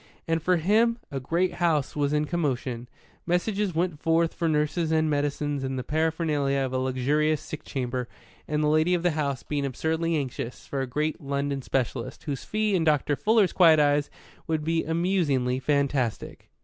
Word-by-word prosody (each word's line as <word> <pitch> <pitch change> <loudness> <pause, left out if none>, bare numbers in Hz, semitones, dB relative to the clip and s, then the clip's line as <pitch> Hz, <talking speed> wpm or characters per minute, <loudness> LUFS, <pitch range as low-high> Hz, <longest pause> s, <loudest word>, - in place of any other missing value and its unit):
And 165 0 +1
for 180 +2 +2
him 220 +7 +3
a 135 - -2
great 170 +8 0
house 160 -6 0
was 145 -1 0
in 150 0 +1
commotion. 130 -7 -2 0.4
Messages 190 +1 0
went 170 -2 -1
forth 165 0 +2
for 165 -2 -1
nurses 155 +2 0
and 155 -1 +2
medicines 145 -1 -1
and 130 0 -2
the 125 - -3
paraphernalia 155 -2 0
of 130 -1 -2
a 130 - +1
luxurious 140 +4 +1
sick 155 0 -8
chamber, 125 -2 -3 0.4
and 150 0 0
the - - +2
lady 155 +4 +3
of 175 - -2
the 175 - +3
house 140 -4 -2
being 145 -1 -2
absurdly 160 +5 -1
anxious 130 -4 -4
for 140 - -3
a 135 - -2
great 150 +6 -2
London 140 0 -2
specialist, 130 -1 -3
whose 140 -4 -4
fee, 215 -1 0
in 180 -3 +2
Dr. 150 -2 +2
Fuller's 215 +2 +3
quiet 165 -4 +6
eyes, 145 0 +2 0.4
would 160 -2 -1
be 165 +1 0
amusingly 160 -7 +1
fantastic. 140 -4 -1
150 Hz, 175 wpm, -26 LUFS, 140-165 Hz, 0.4 s, quiet